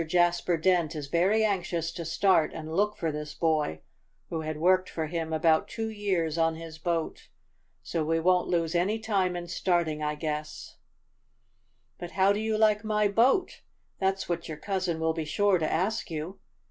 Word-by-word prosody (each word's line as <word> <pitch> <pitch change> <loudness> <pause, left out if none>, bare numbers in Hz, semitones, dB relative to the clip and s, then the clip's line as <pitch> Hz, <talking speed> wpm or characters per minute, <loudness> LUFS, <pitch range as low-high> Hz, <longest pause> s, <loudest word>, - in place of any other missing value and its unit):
Jasper 175 0 +2
Dent 170 -1 +2
is 145 -2 -5
very 190 +7 +3
anxious 175 -5 -1
to 170 0 -6
start 165 0 +3
and 160 0 -6
look 210 +2 +1
for 165 -2 -1
this 150 0 -6
boy, 155 - 0 0.5
who 160 - -2
had 155 -1 -4
worked 185 +3 +3
for 160 - -3
him 160 0 -3
about 160 0 +3
two 225 -1 -4
years 185 -7 -1
on 165 0 +2
his 160 -1 -9
boat. 165 -1 -3 0.5
So 165 -2 -2
we 165 +1 +1
won't 180 +2 +2
lose 165 -2 0
any 185 +5 +1
time 195 -5 0
in 175 0 -5
starting, 170 -4 0
I 150 0 -1
guess." 150 0 -5 1.2
"But 175 -1 -7
how 195 +1 +4
do 205 - -2
you 220 0 0
like 215 -1 +3
my 210 -1 +1
boat? 250 - +2 0.4
That's 190 0 0
what 170 -1 -3
your 155 - -6
cousin 185 -3 -2
will 160 0 +1
be 160 - -3
sure 195 +4 +2
to 155 - -1
ask 195 +7 -1
you. 165 +4 -5
170 Hz, 180 wpm, -28 LUFS, 160-195 Hz, 1.2 s, how